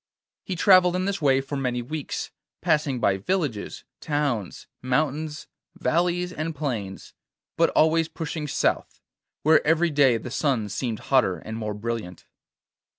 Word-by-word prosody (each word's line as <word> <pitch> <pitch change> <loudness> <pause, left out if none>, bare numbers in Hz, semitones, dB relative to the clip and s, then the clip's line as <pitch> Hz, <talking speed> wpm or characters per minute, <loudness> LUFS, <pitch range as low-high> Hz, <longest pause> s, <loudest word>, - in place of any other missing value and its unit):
He 190 - -4
travelled 180 0 +5
in 185 0 0
this 200 -2 -2
way 135 -2 +3
for 135 +2 -6
many 125 -3 -1
weeks, 150 +3 -5 0.3
passing 150 -6 +1
by 95 -4 +2
villages, 135 - -2 0.2
towns, 140 - -2 0.2
mountains, 150 +4 -1 0.3
valleys, 180 +2 0
and 155 0 -4
plains, 115 -10 -4 0.4
but - - +3
always 160 +1 +4
pushing 160 -1 -5
south, - - -1 0.4
where 155 +1 +5
every 165 +2 +2
day 140 -5 +4
the 120 +2 -8
sun 125 -9 0
seemed 115 +2 -2 0.2
hotter 110 -9 +4
and 110 - -7
more 110 -2 -4
brilliant. 105 -5 -5
145 Hz, 140 wpm, -25 LUFS, 115-160 Hz, 0.4 s, travelled